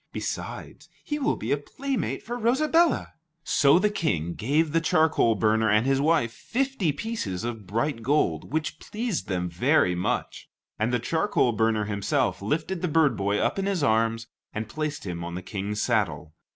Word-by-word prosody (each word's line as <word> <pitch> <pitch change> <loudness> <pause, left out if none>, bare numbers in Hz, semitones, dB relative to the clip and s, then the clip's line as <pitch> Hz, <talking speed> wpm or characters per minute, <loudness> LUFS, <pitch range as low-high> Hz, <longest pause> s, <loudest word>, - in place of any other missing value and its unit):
Besides, - - -6
he 295 0 -3
will 285 - +1
be - - -4
a 145 - +3
playmate 265 - -3
for 240 - -4
Rosabella." 305 +8 +2 0.3
So 145 0 +4
the 210 +3 +2
King 85 - -1
gave 150 - +1
the 165 +1 +2
charcoal 155 -8 +3
burner 110 +1 +2
and 105 +3 +3
his 135 0 +2
wife 135 -7 +2
fifty 260 - -1
pieces 140 - -4
of 115 -4 -5
bright 115 +5 -1
gold, 115 - 0
which 155 0 -2
pleased 220 -3 -3
them 90 -2 -1
very 90 - +2
much, 90 +1 -3 0.3
and 110 +3 +1
the 125 - +2
charcoal 160 - +1
burner 110 -1 +1
himself 105 - 0
lifted 155 - -2
the 180 - 0
bird 155 -2 +3
boy 100 +1 0
up 195 - 0
in 195 - -1
his 190 -6 0
arms, 115 -2 +2 0.3
and 110 0 -3
placed 150 +2 -4
him 85 -2 -4
on 85 0 -5
the 90 - -5
King's 105 +2 -3
saddle. 85 -7 0
130 Hz, 175 wpm, -26 LUFS, 105-165 Hz, 0.3 s, So